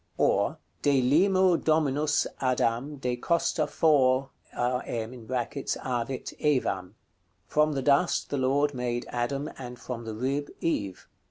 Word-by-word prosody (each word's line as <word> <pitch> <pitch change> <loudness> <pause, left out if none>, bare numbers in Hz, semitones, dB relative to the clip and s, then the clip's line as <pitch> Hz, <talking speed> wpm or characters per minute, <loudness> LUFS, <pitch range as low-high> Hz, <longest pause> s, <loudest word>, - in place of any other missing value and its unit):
Or - - +2 0.2
"De 140 -2 +3
limo 180 +7 +4
Dominus 150 -2 +2
Adam, 130 +2 0
de 125 -3 -2
costa 160 +2 +1
fo(rm) 135 -4 +3 0.3
avit 125 +1 -3
Evam;" 100 -11 0 0.5
From 150 +8 +2
the 135 -2 -2
dust 145 +6 +2
the 145 - 0
Lord 140 +3 +2
made 120 -1 -2
Adam, 135 +4 -2
and 125 -1 -7
from 120 -1 -6
the 110 -1 -5
rib 135 +5 -2
Eve. 100 - -2
130 Hz, 115 wpm, -28 LUFS, 120-145 Hz, 0.5 s, limo